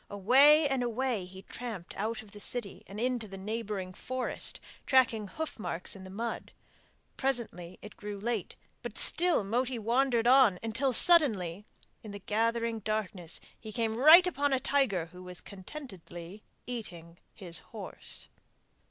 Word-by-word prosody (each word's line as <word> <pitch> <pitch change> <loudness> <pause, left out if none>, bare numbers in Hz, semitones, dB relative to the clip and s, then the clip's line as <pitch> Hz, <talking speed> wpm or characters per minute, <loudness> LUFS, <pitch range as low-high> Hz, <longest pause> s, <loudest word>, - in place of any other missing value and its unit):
Away 275 +10 +5
and 270 -2 -1
away 240 -4 -1
he 190 +1 -12
tramped 220 -6 -7
out 220 +2 -3
of 210 - -17
the 205 - -10
city 215 -1 -4
and 200 +2 -8
into 245 -2 -1
the 195 -1 -9
neighbouring 205 -2 -4
forest, 255 +6 0 0.3
tracking 235 -6 +3
hoof 315 +4 -6
marks 180 -3 -2
in 190 -1 -11
the - - -10
mud. 230 +5 -5 0.6
Presently 230 -10 -2
it 210 0 -11
grew 205 -1 -7
late, 225 -2 -3 0.3
but - - -7
still 350 - +3
Moti 245 +5 -1
wandered 235 +1 +1
on 250 -6 +6
until 230 +4 0
suddenly 215 - +5 0.4
in 215 - -10
the 200 - -7
gathering 230 +2 -1
darkness 205 -5 -3 0.2
he 220 - -9
came 225 0 -1
right 310 +9 +8
upon 285 -5 0
a 265 - +2
tiger 250 - +1
who 180 - -12
was 180 -1 -10
contentedly 190 - -10 0.2
eating 175 -9 -8 0.2
his 175 -5 -7
horse. - - -3
220 Hz, 150 wpm, -30 LUFS, 195-255 Hz, 0.6 s, right